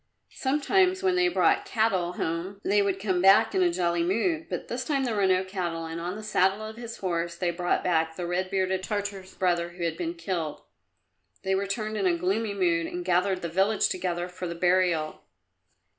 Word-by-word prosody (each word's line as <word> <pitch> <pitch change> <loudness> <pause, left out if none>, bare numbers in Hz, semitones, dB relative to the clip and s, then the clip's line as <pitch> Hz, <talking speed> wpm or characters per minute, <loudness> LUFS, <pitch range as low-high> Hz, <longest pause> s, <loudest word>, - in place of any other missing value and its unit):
Sometimes 370 +7 +1
when 370 -1 +3
they 360 0 +3
brought 400 +3 +3
cattle 215 - 0
home 175 +4 -3
they 205 +1 +3
would 195 -1 0
come 190 -3 0
back 195 +1 +6
in 190 - +2
a 175 -1 +4
jolly 170 -1 0
mood, 315 - 0
but - - -4
this 245 +2 -3
time 275 0 0
there 240 -4 -1
were 200 -2 +2
no 185 0 +3
cattle, 175 -4 -3
and 165 +1 -5
on 175 +3 -3
the 215 - -8
saddle 195 0 +1
of 220 0 -7
his 235 0 -8
horse 170 -2 -2
they 175 -1 -1
brought 175 +1 -1
back 160 -2 +1
the 175 - -4
red 180 +2 -1
bearded 190 -1 0
Tartar's 200 -1 -4
brother 175 -2 +1
who 175 -1 -6
had 165 -1 -1
been 170 -1 -3
killed. 170 -3 -4 0.8
They 190 - 0
returned 215 +3 -2
in 195 -2 +1
a 175 -1 +2
gloomy 200 +4 -1
mood 170 -3 +1
and 175 0 -5
gathered 185 +1 +1
the - - -1
village 195 +5 +2
together 175 -1 -2
for 180 0 -6
the 170 - -5
burial. 175 -3 +1
185 Hz, 205 wpm, -27 LUFS, 175-210 Hz, 0.8 s, back